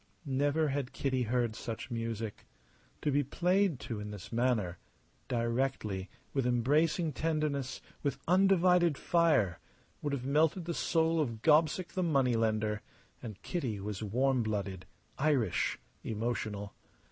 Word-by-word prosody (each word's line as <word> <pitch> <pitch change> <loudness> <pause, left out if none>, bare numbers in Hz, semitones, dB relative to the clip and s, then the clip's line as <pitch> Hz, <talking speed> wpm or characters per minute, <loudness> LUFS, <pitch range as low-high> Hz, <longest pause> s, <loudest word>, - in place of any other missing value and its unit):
Never 145 +3 +1
had 135 -2 -2
Kitty 130 -2 0
heard 120 -2 +1
such 115 +1 -6
music. 115 -2 -4 0.6
To 150 - +2
be 145 +1 +3
played 180 +2 +1
to 115 -3 -4
in 105 0 -5
this 105 -3 -8
manner 115 -7 +1 0.5
directly, 115 -5 -1 0.2
with 135 -3 +1
embracing 150 +7 +2
tenderness, 150 -3 -1 0.2
with 140 -2 -1
undivided 180 -3 +4
fire 150 - +2 0.4
would 145 -1 -2
have 130 -3 -3
melted 155 +5 +2
the 170 - -2
soul 165 0 +2
of 115 -6 -3
Gobseck 160 +3 +4
the 185 - -2
money 135 -8 +2
lender; 110 -1 0 0.4
and 110 -5 -7
Kitty 125 - -2
was 100 0 -4
warm 125 +5 +1
blooded, 100 -4 -3 0.3
Irish, 135 - +1 0.3
emotional. 110 -2 -3
130 Hz, 130 wpm, -32 LUFS, 110-155 Hz, 0.6 s, undivided